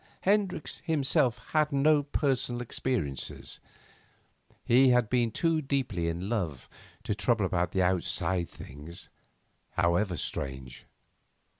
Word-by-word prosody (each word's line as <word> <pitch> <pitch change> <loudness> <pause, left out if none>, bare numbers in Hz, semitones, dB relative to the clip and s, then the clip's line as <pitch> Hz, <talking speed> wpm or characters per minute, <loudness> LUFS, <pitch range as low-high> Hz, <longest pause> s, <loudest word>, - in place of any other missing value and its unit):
Hendricks 195 -5 +1
himself 135 -6 +2
had 155 -1 +2
no 145 +2 +4
personal 135 -4 0
experiences. 120 - -3 1.1
He 130 +2 +6
had 125 -3 +3
been 120 -2 +3
too 165 +7 +1
deeply 130 - -1
in 85 +3 -3
love 85 - -2 0.4
to - - -1
trouble 110 0 +1
about 90 0 -1
outside 90 -1 +1
things, 75 +5 -9 0.6
however 90 +1 +1
strange. 65 -2 -5
115 Hz, 105 wpm, -29 LUFS, 85-135 Hz, 1.1 s, He